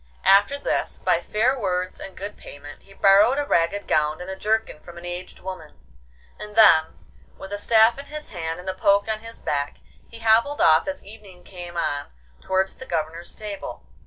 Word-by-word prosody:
After 200 Hz, +8 st, +5 dB
this, 285 Hz, -, -2 dB
by -, -, +1 dB
fair 235 Hz, +5 st, +1 dB
words 185 Hz, -3 st, -2 dB
and 195 Hz, -, -8 dB
good 200 Hz, +2 st, -6 dB
payment, 145 Hz, +1 st, -11 dB
he 195 Hz, -, -21 dB
borrowed 200 Hz, +7 st, +5 dB
a 290 Hz, -, 0 dB
ragged 170 Hz, -1 st, +1 dB
gown 150 Hz, +1 st, +1 dB
and 180 Hz, +2 st, -6 dB
a -, -, -5 dB
jerkin 215 Hz, -4 st, -1 dB
from 170 Hz, +2 st, -13 dB
an 170 Hz, -, -9 dB
aged 175 Hz, +1 st, -7 dB
woman, 180 Hz, -, -9 dB, 0.6 s
and 210 Hz, 0 st, -9 dB
then, 160 Hz, -8 st, +6 dB, 0.4 s
with 195 Hz, +1 st, -8 dB
a 205 Hz, -, -2 dB
staff 225 Hz, +3 st, +4 dB
in 280 Hz, -, -8 dB
his 300 Hz, +1 st, -7 dB
hand 165 Hz, -2 st, -4 dB
and 180 Hz, -, -11 dB
a 190 Hz, -, -1 dB
poke 200 Hz, +2 st, +2 dB
on 220 Hz, -1 st, -2 dB
his 230 Hz, +1 st, -11 dB
back, 145 Hz, 0 st, -2 dB, 0.3 s
he 230 Hz, -, -11 dB
hobbled 230 Hz, +6 st, +3 dB
off 160 Hz, 0 st, +5 dB
as 285 Hz, 0 st, -4 dB
evening 200 Hz, -4 st, -14 dB
came 175 Hz, -2 st, -9 dB
on 145 Hz, -4 st, -2 dB, 0.3 s
towards 190 Hz, 0 st, 0 dB
the 260 Hz, -, -10 dB
Governor's 165 Hz, +1 st, -3 dB
stable. 210 Hz, -2 st, -7 dB
195 Hz, 190 wpm, -23 LUFS, 175-220 Hz, 0.6 s, then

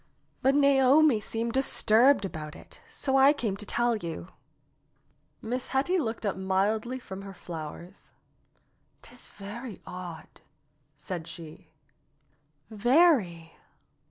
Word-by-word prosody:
"But 270 Hz, +1 st, +3 dB
Naomi 280 Hz, -2 st, +5 dB
seemed 230 Hz, +2 st, -3 dB
disturbed 255 Hz, -2 st, +3 dB
about 155 Hz, -5 st, -7 dB
it, -, -, -13 dB
so 270 Hz, -1 st, -2 dB
I 270 Hz, +2 st, +6 dB
came 225 Hz, -9 st, -2 dB
to 210 Hz, -, -8 dB
tell 240 Hz, 0 st, +1 dB
you." 165 Hz, -, -7 dB, 1.1 s
Miss 245 Hz, +3 st, -3 dB
Hetty 290 Hz, +8 st, +1 dB
looked 225 Hz, -6 st, -3 dB
up 200 Hz, -, 0 dB
mildly 200 Hz, +6 st, 0 dB
from 195 Hz, -6 st, -9 dB
her 195 Hz, -1 st, -10 dB
flowers. 170 Hz, +2 st, -9 dB, 0.9 s
"'Tis -, -, -14 dB
very 210 Hz, +2 st, -9 dB
odd," 175 Hz, -3 st, -9 dB, 0.6 s
said 175 Hz, -4 st, -6 dB
she. 160 Hz, -2 st, -11 dB, 1.0 s
"Very. 220 Hz, -, +2 dB
220 Hz, 110 wpm, -28 LUFS, 185-265 Hz, 1.1 s, I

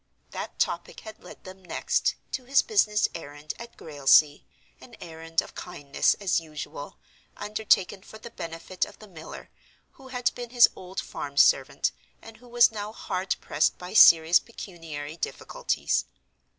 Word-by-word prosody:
That -, -, -6 dB
topic -, -, -2 dB
had 220 Hz, -1 st, -11 dB
led -, -, -13 dB
them, 190 Hz, 0 st, -12 dB
next, 180 Hz, -, 0 dB, 0.2 s
to 255 Hz, -, -4 dB
his 270 Hz, +1 st, +4 dB
business 215 Hz, -, +2 dB
errand 145 Hz, -2 st, -7 dB
at 235 Hz, 0 st, -11 dB
Grailsea—an 145 Hz, 0 st, +1 dB
errand 165 Hz, 0 st, -3 dB
of -, -, -14 dB
kindness, 145 Hz, -6 st, -1 dB
as 195 Hz, -4 st, 0 dB
usual; 160 Hz, -, -8 dB, 0.4 s
undertaken 205 Hz, -2 st, +1 dB
for 220 Hz, -, -13 dB
the 230 Hz, +2 st, -11 dB
benefit 165 Hz, -1 st, -5 dB
of -, -, -5 dB
the 215 Hz, -, -14 dB
miller, 160 Hz, -5 st, -11 dB, 0.4 s
who 270 Hz, -, -16 dB
had 250 Hz, -1 st, -1 dB
been 245 Hz, -1 st, -7 dB
his 240 Hz, -1 st, +7 dB
old 185 Hz, +1 st, -7 dB
farm 140 Hz, 0 st, -7 dB
servant, -, -, +4 dB, 0.3 s
and 225 Hz, -1 st, -13 dB
who 245 Hz, +2 st, -18 dB
was 240 Hz, -1 st, +5 dB
now 210 Hz, -1 st, -5 dB
hard 185 Hz, -3 st, -3 dB
pressed -, -, +1 dB
by 180 Hz, 0 st, -9 dB
serious 165 Hz, -5 st, +8 dB
pecuniary 165 Hz, -8 st, -8 dB
difficulties. -, -, -2 dB
185 Hz, 150 wpm, -26 LUFS, 160-225 Hz, 0.4 s, serious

